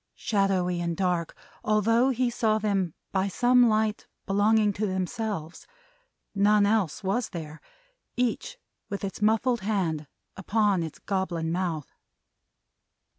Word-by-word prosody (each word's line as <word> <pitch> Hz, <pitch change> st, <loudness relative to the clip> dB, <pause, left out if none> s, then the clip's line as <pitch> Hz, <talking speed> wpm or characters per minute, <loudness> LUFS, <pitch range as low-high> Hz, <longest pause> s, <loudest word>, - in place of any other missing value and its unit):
Shadowy 190 Hz, -4 st, 0 dB
and 170 Hz, -1 st, -2 dB
dark, 180 Hz, -3 st, -1 dB, 0.3 s
although 230 Hz, +4 st, +3 dB
he 250 Hz, -1 st, 0 dB
saw 220 Hz, -2 st, +1 dB
them 195 Hz, -6 st, -1 dB, 0.2 s
by 190 Hz, 0 st, +1 dB
some 245 Hz, +4 st, +4 dB
light 215 Hz, 0 st, 0 dB, 0.2 s
belonging 210 Hz, +1 st, +3 dB
to 210 Hz, +2 st, -1 dB
themselves 190 Hz, -3 st, -4 dB, 0.7 s
none 205 Hz, +1 st, +4 dB
else 205 Hz, -5 st, 0 dB
was 205 Hz, +5 st, 0 dB
there 155 Hz, -4 st, -8 dB, 0.6 s
each 250 Hz, -, -1 dB, 0.3 s
with 200 Hz, -1 st, -5 dB
its 195 Hz, +1 st, -5 dB
muffled 225 Hz, +2 st, +2 dB
hand 180 Hz, -7 st, -1 dB, 0.3 s
upon 205 Hz, -1 st, +1 dB
its 160 Hz, -2 st, -5 dB
goblin 175 Hz, -4 st, -2 dB
mouth. 170 Hz, -4 st, -3 dB
200 Hz, 120 wpm, -27 LUFS, 180-220 Hz, 0.7 s, some